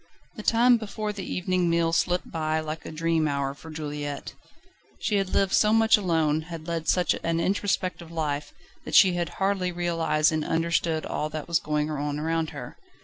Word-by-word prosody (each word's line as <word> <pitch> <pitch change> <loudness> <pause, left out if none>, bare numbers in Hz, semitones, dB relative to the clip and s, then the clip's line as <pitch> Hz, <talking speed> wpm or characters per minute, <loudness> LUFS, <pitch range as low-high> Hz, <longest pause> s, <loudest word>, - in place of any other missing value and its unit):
The - - -6
time 235 +3 +5
before 215 -1 -4
the 195 -3 -6
evening 180 -1 0
meal 165 0 +2
slipped 180 +1 0
by 155 -1 0
like 155 0 -5
a - - -6
dream 160 0 +1
hour 140 -1 -1
for 160 +3 -13
Juliette. 145 -2 -5 0.6
She 210 - 0
had 195 -1 0
lived 195 0 +1
so 215 0 +4
much 225 0 +6
alone, 160 -6 +1
had 165 -1 -7
led 165 -1 -3
such 180 -1 +3
an 165 0 0
introspective 185 -2 -1
life, 150 -3 -2 0.3
that - - -4
she 190 -2 +7
had 175 -1 -1
hardly 190 -2 0
realised 165 -3 +1
and 155 -1 -1
understood 165 0 0
all 150 - -2
that 155 0 -6
was 170 -1 +2
going 150 0 -1
on 145 0 -2
around 160 +1 -1
her. - - -9
165 Hz, 185 wpm, -26 LUFS, 155-185 Hz, 0.6 s, she